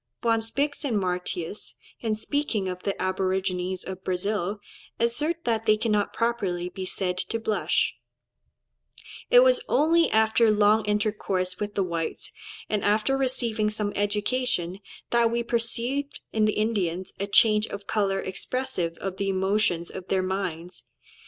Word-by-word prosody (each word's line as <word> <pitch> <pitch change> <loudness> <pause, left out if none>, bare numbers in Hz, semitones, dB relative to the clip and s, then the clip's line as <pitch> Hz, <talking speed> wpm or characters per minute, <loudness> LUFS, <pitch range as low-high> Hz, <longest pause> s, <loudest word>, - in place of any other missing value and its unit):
Von 225 -1 +3
Spix 280 +7 -1
and 245 -7 0
Martius, 180 0 -3 0.2
in 220 -2 -1
speaking 225 -4 -1
of 180 0 -4
the 200 - -2
aborigines 185 -1 -1
of 190 0 -7
Brazil, 200 +2 -1 0.4
assert 295 +9 0
that 225 -1 0
they 215 0 +5
cannot 210 -2 +1
properly 195 -7 -1
be 185 +1 -6
said 180 -1 -2
to 230 - -2
blush; 220 -1 +1 1.4
"it - - +8
was - - +4
only 330 +3 +4
after 220 +1 +4
long 210 +1 +4
intercourse 205 -3 0
with 205 0 -4
the 195 - +2
whites, 170 -2 -4 0.4
and 210 -2 -1
after 215 +6 +2
receiving 240 -5 0
some 210 -1 -2
education, 205 -2 0 0.3
that 235 -1 +4
we 235 +1 0
perceived 240 +4 -1
in 215 -1 +3
the 215 - +2
Indians 190 -4 -1
a 200 - -1
change 215 +1 +5
of 200 0 -7
colour 195 -2 0
expressive 190 -2 -3
of 190 -1 -5
the 195 0 -1
emotions 190 -2 +1
of 185 -1 -8
their 190 -1 +1
minds." 180 -2 -4
210 Hz, 145 wpm, -26 LUFS, 185-230 Hz, 1.4 s, it